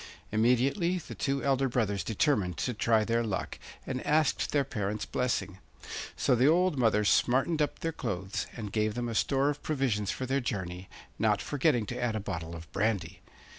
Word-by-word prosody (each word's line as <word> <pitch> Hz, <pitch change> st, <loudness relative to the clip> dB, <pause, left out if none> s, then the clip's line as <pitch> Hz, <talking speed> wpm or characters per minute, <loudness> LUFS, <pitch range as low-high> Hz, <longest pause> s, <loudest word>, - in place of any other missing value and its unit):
Immediately 125 Hz, -, +2 dB
the 175 Hz, -, -7 dB
two 140 Hz, -1 st, -1 dB
elder 135 Hz, -1 st, +2 dB
brothers 105 Hz, -5 st, 0 dB
determined 105 Hz, -, +1 dB
to 125 Hz, -, -1 dB
try 110 Hz, 0 st, +2 dB
their 115 Hz, +1 st, +1 dB
luck, 105 Hz, -5 st, -3 dB, 0.3 s
and 130 Hz, -1 st, -3 dB
asked 155 Hz, 0 st, +2 dB
their 145 Hz, -1 st, +3 dB
parents' 105 Hz, -4 st, -3 dB
blessing. 115 Hz, -6 st, -1 dB, 0.6 s
So -, -, +2 dB
the 125 Hz, +3 st, +4 dB
old 180 Hz, +1 st, +4 dB
mother 110 Hz, -5 st, +2 dB
smartened 135 Hz, +9 st, +3 dB
up 150 Hz, -, 0 dB
their 165 Hz, -, -2 dB
clothes, 100 Hz, -, -3 dB
and 105 Hz, -3 st, -5 dB
gave 110 Hz, 0 st, 0 dB
them 120 Hz, 0 st, -2 dB
a 115 Hz, -, -3 dB
store 135 Hz, +5 st, +2 dB
of 145 Hz, -, -8 dB
provisions 125 Hz, -9 st, 0 dB
for 130 Hz, -, -2 dB
their 135 Hz, +2 st, 0 dB
journey, 95 Hz, -6 st, -4 dB, 0.3 s
not -, -, +3 dB
forgetting 140 Hz, -5 st, +1 dB
to 125 Hz, +3 st, -5 dB
add 120 Hz, -2 st, 0 dB
a -, -, 0 dB
bottle 85 Hz, -5 st, -5 dB
of 85 Hz, 0 st, -8 dB
brandy. 100 Hz, -4 st, -1 dB
120 Hz, 180 wpm, -30 LUFS, 105-135 Hz, 0.6 s, the